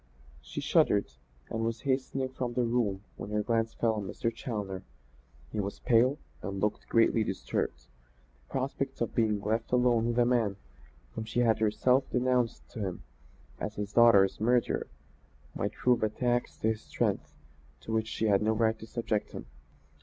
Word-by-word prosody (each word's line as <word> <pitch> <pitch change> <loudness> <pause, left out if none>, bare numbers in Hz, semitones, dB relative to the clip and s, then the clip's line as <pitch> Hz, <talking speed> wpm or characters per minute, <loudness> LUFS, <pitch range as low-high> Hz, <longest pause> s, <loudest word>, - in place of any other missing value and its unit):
She - - -6
shuddered, 100 -8 +3 0.4
and 115 0 -1
was 115 0 -2
hastening 130 -1 -1
from 125 -2 -4
the 125 - +2
room 115 -5 0
when - - -6
her 105 0 0
glance 115 0 0
fell 115 -1 +2
on 105 -3 -4
Mr. 115 +6 -2
Challoner. 105 -6 -4 0.7
He - - -3
was 100 0 -3
pale 125 +4 +3 0.2
and 100 0 -4
looked 105 +1 -1
greatly 115 -1 +4
disturbed. - - -2 0.7
The - - -27
prospect 135 0 -2
of 120 - -1
being 110 -3 +2
left 110 +3 -1
alone 125 -2 +3
with 120 0 -1
a 120 - +5
man 115 -5 +2 0.6
whom 110 - -4
she 115 +2 0
had 110 -2 +3
herself 125 +5 +2
denounced 125 -1 0
to 115 - -8
him 95 - -4 0.6
as 105 - -4
his 105 0 -4
daughter's 110 -5 +6
murderer, 120 +1 +2 0.7
might - - -2
prove 125 -1 +2
a 110 - +2
tax 120 +2 -1
to 110 - +1
his 110 -1 -2
strength - - -2 0.5
to 110 - -5
which 110 0 +1
she 110 - -2
had 100 -2 +4
no 110 +1 +2
right 110 0 +1
to 110 - -9
subject 110 -2 -2
him. - - -7
115 Hz, 175 wpm, -30 LUFS, 105-120 Hz, 0.7 s, daughter's